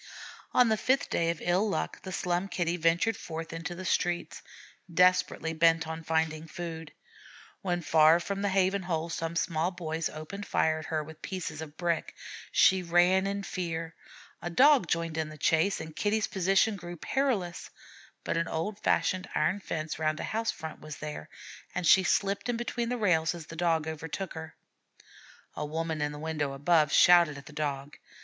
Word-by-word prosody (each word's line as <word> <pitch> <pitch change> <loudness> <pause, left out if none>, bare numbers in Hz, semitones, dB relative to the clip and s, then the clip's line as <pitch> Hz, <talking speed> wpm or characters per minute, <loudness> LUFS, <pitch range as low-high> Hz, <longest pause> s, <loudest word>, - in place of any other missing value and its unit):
On 250 -2 +5
the 220 - +2
fifth 260 +6 +1
day 165 0 +1
of 170 -2 -3
ill 185 +5 +2
luck - - -3
the 190 - -7
Slum 180 +1 -1
Kitty 175 -3 -1
ventured 170 +6 +2
forth 165 -2 -6
into 165 +1 -5
the 185 +2 -7
street, 175 -1 -1 0.5
desperately 180 -2 +3
bent 165 0 +3
on 160 0 -5
finding 160 0 -1
food. 165 -2 -7 0.7
When 175 -2 -1
far 160 +1 +5
from 200 +3 -4
the 200 - +1
haven 190 +1 +2
hole 170 -2 -2
some 165 0 -3
small 165 0 0
boys 165 -3 -3
opened 155 +7 -7
fire 160 0 +1
at 155 - -8
her 155 -1 -1
with 155 +1 -12
pieces 175 -5 -5
of 155 -1 -9
brick. 170 -2 -1 0.4
She 190 0 +5
ran 180 +2 +3
in 200 0 -3
fear. 165 -4 -4 0.5
A 175 - -3
Dog 265 - +5
joined 165 -1 -1
in 155 -1 -2
the 155 - -10
chase, 160 +6 +2
and 160 -1 -8
Kitty's 210 +1 +1
position 195 +3 +2
grew 175 -1 -8
perilous; 205 - -1 0.5
but - - -1
an 165 0 0
old 200 +7 -3
fashioned 185 -1 +1
iron 185 +6 +1
fence 155 -5 -4
round 155 0 0
a - - -3
house 225 +1 -2
front 160 -1 -5
was 155 -1 -8
there, 150 - -7 0.5
and 180 -1 -1
she 190 - +7
slipped 200 +4 0
in 240 - 0
between 235 0 -2
the 250 - -1
rails 175 -6 +2
as 165 -3 -8
the 165 - -10
Dog 165 -2 +1
overtook 160 +4 -5
her. 160 -1 -8 1.0
A - - -4
woman 160 +1 -3
in 145 0 0
a 150 - -8
window 150 -3 -2
above 150 +1 +3
shouted 170 -4 +6
at 140 - -11
the 150 - -12
Dog. 145 -1 -3
170 Hz, 185 wpm, -29 LUFS, 160-190 Hz, 1.0 s, she